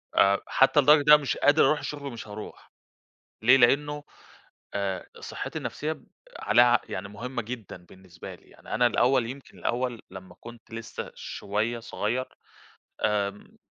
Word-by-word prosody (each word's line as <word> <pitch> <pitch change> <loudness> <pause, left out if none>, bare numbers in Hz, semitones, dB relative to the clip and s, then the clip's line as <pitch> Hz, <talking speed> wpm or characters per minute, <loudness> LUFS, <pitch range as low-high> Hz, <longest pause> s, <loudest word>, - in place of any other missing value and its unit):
آآ 100 0 +5
حتّى 135 +2 +4
لدرجة 145 +2 +7
إن 145 - -8
أنا - - +10
مش 145 -2 -2
قادر 145 +2 +5
أروح 150 - +3
الشُغل 140 -1 -6
مش 115 -1 -8
هاروح، 105 +1 -10 0.7
ليه؟ 125 +4 +7
لإنّه 145 +4 +3 0.7
آآ 100 -2 -2
صحّتي - - -5
النَفْسية 155 +1 -3
ب - - -12 0.3
عليها 120 - +5
ع 120 0 +4
يعني 100 +2 -5
مُهمة 120 +4 -5
جدًا 115 -2 -7
بالنسبة 95 -1 -12
لي، - - -25
يعني - - -9
أنا 120 +2 +4
الأول 120 +1 +2
يمكن 135 +3 -10
الأول 120 -1 -2
لمّا 95 -1 -11
كنت 120 -1 -13
لسّه 115 0 -7
شوية 110 +4 -3
صغيّر 120 +3 -2 0.8
آمم 105 -1 -2
120 Hz, 155 wpm, -27 LUFS, 105-135 Hz, 0.8 s, أنا